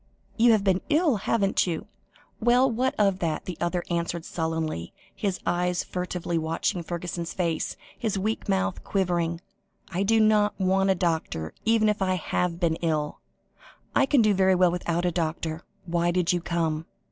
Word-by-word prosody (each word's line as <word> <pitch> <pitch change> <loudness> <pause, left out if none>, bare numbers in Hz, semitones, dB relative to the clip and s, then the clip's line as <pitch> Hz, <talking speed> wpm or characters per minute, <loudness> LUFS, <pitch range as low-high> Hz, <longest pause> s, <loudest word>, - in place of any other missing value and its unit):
You 235 +1 +5
have 210 -2 +2
been 190 -2 +2
ill, 305 -3 +3
haven't 195 -1 +1
you?" 165 -2 -3 0.5
"Well, 245 +3 +4
what 255 +3 0
of 195 -3 +2
that?" 160 -3 -2
the 180 - -5
other 175 0 0
answered 170 0 -2
sullenly, 160 - -3 0.2
his 195 -3 -2
eyes 180 0 0
furtively 180 -2 -3
watching 165 +3 -1
Fergusson's 170 0 -5
face, 170 -3 -1 0.2
his 215 -4 -1
weak 215 +2 -2
mouth 190 -1 0
quivering. 175 -3 0 0.5
"I 185 +1 -2
don't 215 0 +3
want 190 +1 +2
a 190 - +4
doctor, 160 - -2
even 225 -1 +4
if 210 -1 0
I 185 -1 +2
have 175 0 -1
been 165 -2 +1
ill. 155 -3 -1 0.8
I 270 - +4
can 270 -4 +4
do 215 -1 +4
very 190 -1 +4
well 180 -1 +4
without 175 0 -1
a 175 - +2
doctor. 160 -1 -2 0.2
Why 170 0 +1
did 180 0 +2
you 175 - 0
come?" 165 -2 -1
180 Hz, 165 wpm, -26 LUFS, 170-200 Hz, 0.8 s, You